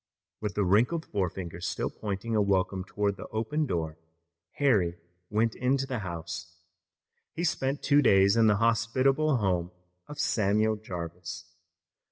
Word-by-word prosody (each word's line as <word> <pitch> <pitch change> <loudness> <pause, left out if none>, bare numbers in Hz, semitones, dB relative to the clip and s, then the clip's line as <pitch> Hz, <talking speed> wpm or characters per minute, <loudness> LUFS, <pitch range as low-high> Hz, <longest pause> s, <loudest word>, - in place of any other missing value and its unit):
With 105 -3 -4
the 105 - +2
wrinkled 120 - +2
forefinger 90 -3 -3
still 90 - -2
pointing 105 +2 -4
a 105 - +4
welcome 95 -1 +1
toward 100 0 -1
the 100 - -8
open 115 +8 -1
door 80 -4 -3 0.5
Harry 100 -12 +2 0.3
went 110 +1 +1
into 130 +2 0
the 130 -3 -3
house. 85 -2 -6 0.8
He 170 - -2
spent 140 -4 -1
two 145 -1 +5
days 100 -4 +5
in 115 -1 +5
the 105 - +5
hospitable 125 +6 +2
home 90 -5 0 0.4
of 150 - -9
Samuel 110 +1 +2
Jarvis. 85 -4 -7
105 Hz, 140 wpm, -28 LUFS, 90-120 Hz, 0.8 s, two